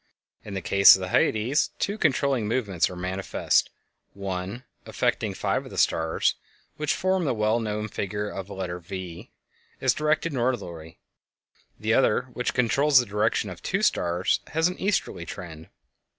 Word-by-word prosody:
In 100 - -7
the 95 - -4
case 100 0 +8
of - - -4
the 95 -1 -4
Hyades, 115 - +2
two 200 - -1
controlling 140 - +1
movements 105 -7 0
are 90 - -8
manifest: 95 +2 0 0.5
one, 100 +4 -4 0.2
affecting - - -1
five - - -1
of - - -11
the - - -9
stars 80 0 +2 0.4
which 150 -1 -1
form 185 -1 +1
the 135 -6 0
well 110 +2 +1
known 105 -1 -3
figure 105 0 -3
of 95 -1 -6
a - - -7
letter 90 -2 -4
"V," 90 -1 -8 0.5
is - - +3
directed 155 +1 0
northerly; 95 - -3 0.8
the 110 +1 0
other, 125 -1 +3
which 125 - -2
controls 135 +4 +3
the 125 - 0
direction 105 +1 0
of - - -10
two - - -1
stars, 90 +1 +1
has 160 +2 +1
an 180 - -5
easterly 195 - -1
trend. 80 -3 -9
105 Hz, 160 wpm, -26 LUFS, 95-130 Hz, 0.8 s, case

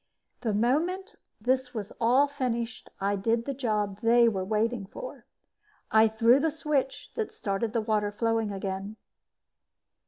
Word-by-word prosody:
The 220 -5 -1
moment 330 - 0 0.2
this 250 +2 0
was 210 -2 -5
all 255 +5 +5
finished, 250 -4 -3
I 200 +1 +1
did 230 +4 0
the 275 - -2
job 210 -6 -1
they 235 +1 +5
were 195 -5 0
waiting 215 +1 0
for. - - -9 0.6
I 220 0 +6
threw 230 +4 +4
the 320 +3 +2
switch 300 -4 -2
that 445 -2 -3
started 200 +2 -2
the 230 0 0
water 215 -1 0
flowing 225 0 0
again. 195 +1 -4
230 Hz, 145 wpm, -28 LUFS, 210-260 Hz, 0.6 s, I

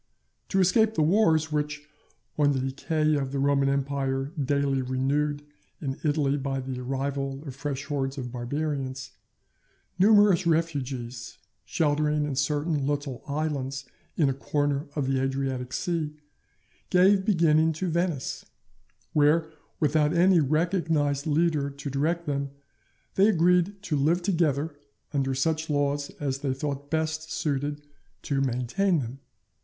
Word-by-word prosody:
To 195 - +1
escape 220 +4 +3
the 155 - +3
wars 160 -3 +3
which, 150 0 -2 0.5
on 145 -1 +3
the 135 - 0
decay 155 +4 0
of 135 -3 -1
the 140 - -2
Roman 140 0 +2
Empire 140 0 -1
daily 140 0 +1
renewed 140 +3 0 0.4
in 135 -3 -4
Italy 145 -2 +1
by 135 -1 -2
the 130 -1 -5
arrival 135 +1 -3
of 135 -3 -7
fresh 140 -1 -4
hordes 140 -2 -2
of 125 -3 -5
Barbarians, 135 +1 -3 0.9
numerous 205 -3 +5
refugees, 130 -8 -2 0.3
sheltering 150 -1 +1
in 145 -2 -3
certain 145 +1 0
little 145 -3 -2
islands 140 -2 -2 0.3
in 155 - +4
a 135 - +1
corner 145 +1 -1
of 145 -3 0
the 135 0 +1
Adriatic 135 -1 -2
Sea, 155 -1 -2 0.7
gave 190 +2 +5
beginning 160 -5 +3
to 180 +4 -3
Venice; 170 -4 -1 0.7
where, 155 +2 +3 0.3
without 150 0 +2
any 180 +1 +5
recognized 155 -2 +1
leader 155 -2 +1
to 140 0 -7
direct 165 +5 0
them, 140 -1 -2 0.6
they 195 +2 +5
agreed 180 0 +3
to 160 - -1
live 160 +5 +2
together 160 -5 +1 0.4
under 135 -2 0
such 160 +4 0
laws 145 -1 0
as 135 -2 -2
they 135 -2 -1
thought 140 0 -4
best 160 0 -2
suited 145 0 -2 0.4
to 135 -2 0
maintain 135 +9 +1
them. 130 -1 -4
145 Hz, 135 wpm, -27 LUFS, 135-160 Hz, 0.9 s, numerous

